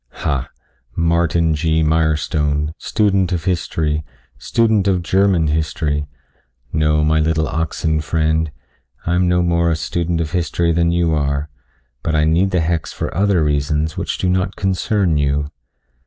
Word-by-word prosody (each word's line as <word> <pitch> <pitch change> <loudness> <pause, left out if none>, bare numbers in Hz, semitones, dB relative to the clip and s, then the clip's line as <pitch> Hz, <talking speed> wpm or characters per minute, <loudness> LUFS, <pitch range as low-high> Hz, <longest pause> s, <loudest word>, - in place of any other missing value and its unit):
"Ha 70 -4 -1 0.5
Martin 85 -1 +2
G. 80 +1 +1
Mirestone, 75 -1 0
student 100 -4 +1
of 85 -3 -1
history, 80 -3 -1 0.4
student 110 - +1
of 90 -3 +1
German 95 -2 +2
history. 75 -1 -1 0.7
No 75 -1 +2
my 80 +1 +3
little 80 0 +1
oxen 80 -1 -1
friend. 80 +1 0 0.6
I 85 - 0
am 90 +1 +2
no 90 0 +2
more 85 -1 +2
a 80 - +1
student 85 +1 -2
of 80 -2 -2
history 85 -1 0
than 85 0 +2
you 85 -1 +1
are, 70 0 -1 0.5
but 80 - -1
I 75 - +3
need 85 +5 +2
the 90 -2 +1
hex 80 0 -1
for - - -4
other 95 -3 +2
reasons 75 +1 0
which - - -3
do - - -1
not 90 +1 0
concern 95 -2 0
you." 70 0 0
80 Hz, 150 wpm, -19 LUFS, 75-85 Hz, 0.7 s, my